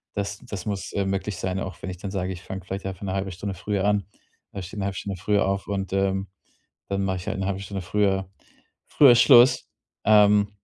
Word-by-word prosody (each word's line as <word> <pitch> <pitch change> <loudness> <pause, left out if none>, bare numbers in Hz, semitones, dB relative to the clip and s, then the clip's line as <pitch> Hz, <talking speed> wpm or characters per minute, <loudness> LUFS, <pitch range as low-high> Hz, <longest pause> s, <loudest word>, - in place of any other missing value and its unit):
das 100 0 -3
das 100 -6 -6
muss, 100 -3 -4
äh, 100 - 0
möglich 95 0 -2
sein, 95 0 -2
auch 95 -3 -6
wenn - - -5
ich 90 - -8
dann 95 +1 -6
sage: 95 -1 -2
„Ich 85 - -9
fange 95 -1 -7
vielleicht 95 +1 -5
einfach 95 0 -5
'ne 95 -1 -2
halbe 95 -1 -2
Stunde 95 +2 -5
früher 100 +1 -2
an, 105 -1 +2 0.5
äh, 100 - -5
stehe 95 +4 -7
'ne 100 - -1
halbe 95 -1 -3
Stunde 100 -2 -4
früher 105 0 +2
auf 95 0 -2
und, 95 -1 -3
ähm, 95 0 0 0.6
dann 100 0 -1
mache 95 -1 -1
ich 90 - -9
halt - - -2
'ne 95 - -1
halbe 100 -1 -2
Stunde 100 -1 -5
früher 95 -1 +1 0.6
früher 140 -4 +7
Schluss“. 125 +1 +6 0.4
Ähm, 105 -1 +5
95 Hz, 225 wpm, -25 LUFS, 95-100 Hz, 0.6 s, früher